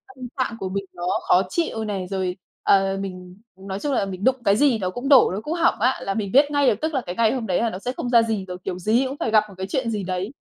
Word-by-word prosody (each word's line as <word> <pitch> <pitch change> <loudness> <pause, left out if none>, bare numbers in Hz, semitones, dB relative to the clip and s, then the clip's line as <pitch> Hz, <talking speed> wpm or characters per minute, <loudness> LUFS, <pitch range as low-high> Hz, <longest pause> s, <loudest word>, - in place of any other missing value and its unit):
tâm 255 -1 -7
trạng 255 -3 -1
của 190 - -3
mình 195 +1 -3
nó 175 - -8 0.2
khó 180 - +5
chịu 320 - -2
này, 195 -3 -3
rồi, 185 -1 -2 0.3
ờ, 195 0 +3
mình 185 -2 -7 0.2
nói 190 +1 -6
chung 285 +5 -2
là 220 - +1
mình 190 0 -7
đụng 260 +2 +4
cái 200 0 +4
gì 255 -1 +3
nó 185 -2 -1
cũng 245 +8 -5
đổ, 270 -4 +7
nó 195 +3 -3
cũng 300 +8 -4
hỏng 340 0 +2
á, 255 +4 +2
là 195 - -2
mình 200 -2 -3
biết 285 +2 +5
ngay 285 -2 +2
được, - - +4
tức 315 0 -1
là 265 - 0
cái 180 -5 -6
ngày 225 0 +3
hôm 245 -4 -3
đấy 180 - +1
là 230 - +1
nó 185 - -6
sẽ 245 - -3
không 245 - -3
ra 235 -1 +6
gì 220 -4 -2
rồi, 180 -1 -7
kiểu 180 - -4
gì 220 +8 +2
cũng 270 +2 -6
phải 225 - -1
gặp 215 -1 +5
một - - -12
cái 190 0 -4
chuyện 240 +4 -1
gì 210 -3 -2
đấy. 185 +3 -3
210 Hz, 305 wpm, -23 LUFS, 190-255 Hz, 0.3 s, đổ